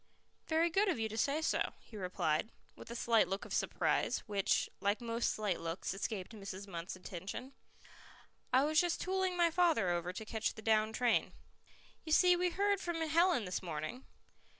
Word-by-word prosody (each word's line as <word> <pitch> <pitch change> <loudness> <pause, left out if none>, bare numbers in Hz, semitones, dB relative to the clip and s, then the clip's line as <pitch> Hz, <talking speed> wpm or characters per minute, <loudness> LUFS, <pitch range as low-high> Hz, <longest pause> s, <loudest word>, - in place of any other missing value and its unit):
"Very 330 +1 +2
good 395 +4 +3
of 355 - +1
you 225 -1 -1
to 220 - -6
say 285 +7 +1
so," - - 0
he 225 - -15
replied, 180 -2 -1 0.3
with - - -12
a 235 - -6
slight 230 -2 +3
look 195 +2 -3
of - - -7
surprise, - - 0
which, 200 -2 +1
like 200 +2 +1
most 235 0 -1
slight 210 -5 -1
looks, 165 +3 -3
escaped 195 0 -4
Mrs. 200 -2 -7
Munt's 170 -1 -5
attention. 190 +8 -7 1.0
"I 260 +2 +5
was 310 +1 +3
just 350 -1 -1
tooling 375 -1 0
my 340 -1 +4
father 320 - +3
over 175 0 -1
to 220 +4 -7
catch 220 0 -2
the 220 - -10
down 215 0 +3
train." 240 +1 +1 0.7
"You 315 - -1
see, 360 +2 +6
we 360 +1 +1
heard 400 +2 +1
from 345 -1 -2
Helen 325 - +3
this 180 - -3
morning." 170 - -5
225 Hz, 180 wpm, -35 LUFS, -, 1.0 s, see